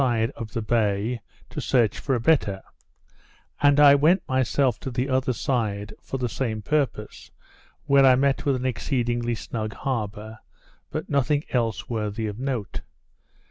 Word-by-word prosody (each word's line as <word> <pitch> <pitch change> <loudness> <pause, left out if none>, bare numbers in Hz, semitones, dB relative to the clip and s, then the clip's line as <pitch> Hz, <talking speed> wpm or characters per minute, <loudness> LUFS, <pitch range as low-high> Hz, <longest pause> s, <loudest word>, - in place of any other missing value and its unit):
side 115 -4 +1
of 115 -2 -8
the 115 - -2
bay, 110 +1 0 0.3
to - - -6
search 120 -6 +2
for 135 - 0
a - - 0
better; 115 -8 +1 1.0
and 145 0 +5
I 145 -1 +9
went 155 +7 +3
myself 130 -2 +1
to 135 - -5
the 125 +1 -2
other 130 -1 +1
side, 105 -5 -2
for 135 - -5
the 125 -1 -1
same 110 -3 -3
purpose, 130 -6 -2 0.6
where 140 0 +5
I 130 -1 +7
met 135 +1 +1
with 140 -2 +1
an 130 0 -4
exceedingly 120 -2 -1
snug 110 0 -5
harbour, 110 -3 -4 0.5
but - - -4
nothing 145 +1 +1
else 115 -4 -1
worthy 110 -1 -3
of 105 +1 -5
notice. 125 -7 -3
120 Hz, 155 wpm, -25 LUFS, 110-135 Hz, 1.0 s, I